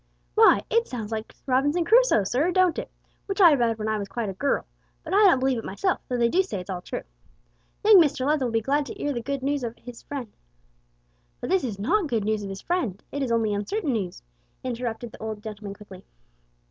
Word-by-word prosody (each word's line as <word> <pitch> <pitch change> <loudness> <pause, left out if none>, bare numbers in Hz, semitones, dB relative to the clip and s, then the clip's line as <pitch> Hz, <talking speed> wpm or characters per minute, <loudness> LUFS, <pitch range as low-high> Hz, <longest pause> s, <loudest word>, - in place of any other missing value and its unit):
'" - - -41
"Why, 445 0 +6
it 465 0 +2
sounds 225 -4 -6
like 220 0 -5
Robinson 290 +6 +2
Crusoe, 475 - +5
sir, 255 - +1
don't 365 -2 +3
it? - - -6 0.4
which 390 0 -3
I 345 -5 +8
read 235 -5 +1
when 215 0 -3
I 215 -1 0
was 200 - -4
quite 220 +1 -3
a - - -4
gurl, 275 +9 0 0.4
but - - -5
I - - +4
don't 345 - +5
believe 260 -2 +1
it - - -7
myself 360 - -1
though 250 - -1
they 235 -1 +3
do 355 +11 +3
say 380 - -4
it's 180 +2 -7
all 180 -1 -4
true. - - -5 0.8
Young 420 -4 +9
Mr 285 -4 +1
Leather 295 -2 +2
will 240 - -2
be 225 0 +1
glad 285 +5 0
to - - -8
'ear 290 - -1
the 240 - -3
good 275 +2 -4
noos 280 -1 0
of 235 0 -4
'is 245 -1 -9
friend 260 -7 -7 0.6
" - - -41
"But - - -4
this 380 -1 +3
is 225 -6 -3
not 335 - +1
good 225 -5 0
news 215 0 0
of 200 - -6
his 195 0 -7
friend; 250 - -2
it 285 - -3
is 260 -3 -1
only 225 -2 +1
uncertain 285 - -1
news," 190 - -4 0.4
interrupted 240 -2 -4
the - - -13
old 215 -1 -5
gentleman 210 -2 -7
quickly. 195 -2 -13
245 Hz, 235 wpm, -25 LUFS, 215-295 Hz, 0.8 s, Young